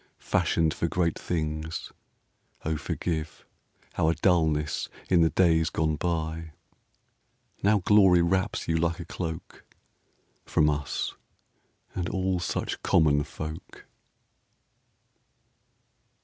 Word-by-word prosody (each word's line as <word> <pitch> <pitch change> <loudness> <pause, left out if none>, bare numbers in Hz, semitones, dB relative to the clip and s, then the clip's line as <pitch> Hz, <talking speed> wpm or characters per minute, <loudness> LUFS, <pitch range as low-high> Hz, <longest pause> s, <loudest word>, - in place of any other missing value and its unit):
Fashioned 80 -1 +1
for 85 - -1
great 85 -1 0
things, 80 -1 -3 0.7
O 80 0 0
forgive 80 0 -4 0.5
Our 80 +1 +3
dullness 80 -5 +1 0.2
in 90 -2 +5
the 80 - +5
days 80 -3 +3
gone 80 -1 0
by! 80 -1 -3 1.1
Now 100 -1 +3
glory 95 -5 +6
wraps 95 +2 0
you 80 0 +1
like 85 +1 0
a 85 - -6
cloak 80 -1 -6 0.8
From 75 -1 +2
us, 75 -4 -3 0.8
and 90 -1 -2
all 95 -1 0
such - - -3
common 75 -2 +3
folk. 80 +2 -8
80 Hz, 100 wpm, -27 LUFS, 80-90 Hz, 1.1 s, glory